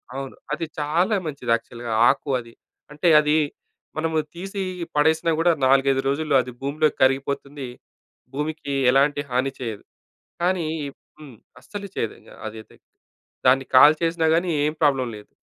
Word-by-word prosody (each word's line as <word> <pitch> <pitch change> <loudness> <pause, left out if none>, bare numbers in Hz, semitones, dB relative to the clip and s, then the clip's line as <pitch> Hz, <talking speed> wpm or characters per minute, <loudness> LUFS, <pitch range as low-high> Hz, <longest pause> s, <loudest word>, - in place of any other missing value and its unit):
అవును, 135 0 -6 0.2
అది 165 +2 -2
చాలా 170 +8 +1
మంచిది 140 -6 -3
యాక్చువల్‌గా 115 0 -4 0.2
ఆకు - - -1
అది. 115 -1 -12 0.4
అంటే, 150 +4 -1
అది 150 0 +2 0.6
మనము 160 0 0 0.2
తీసి 195 +3 -5 0.3
పడేసినా 160 +3 +3
కూడా 170 +1 +4
నాలుగైదు 135 0 +3
రోజుల్లో 150 +1 0
అది 125 +1 -8
భూమిలో 145 +3 +1
కరిగిపోతుంది. 140 +1 0 0.7
భూమికి 150 0 -3 0.2
ఎలాంటి 145 +2 +3
హాని 130 +2 0
చేయదు. 115 -5 -5 0.6
కానీ 180 -1 +1 0.2
ఈ - - -4 0.3
హ్మ్. 145 -6 -12 0.2
అస్సలు 200 +9 -8
చేయదు 115 - -2 0.3
అదైతే. 110 0 -9 0.7
దాన్ని 135 +1 +5
కాల్చేసినా 160 +4 +5
కానీ 175 +1 0
ఏం 150 - +1
ప్రాబ్లమ్ 135 -5 +2
లేదు. 105 - -16
145 Hz, 130 wpm, -23 LUFS, 130-160 Hz, 0.7 s, దాన్ని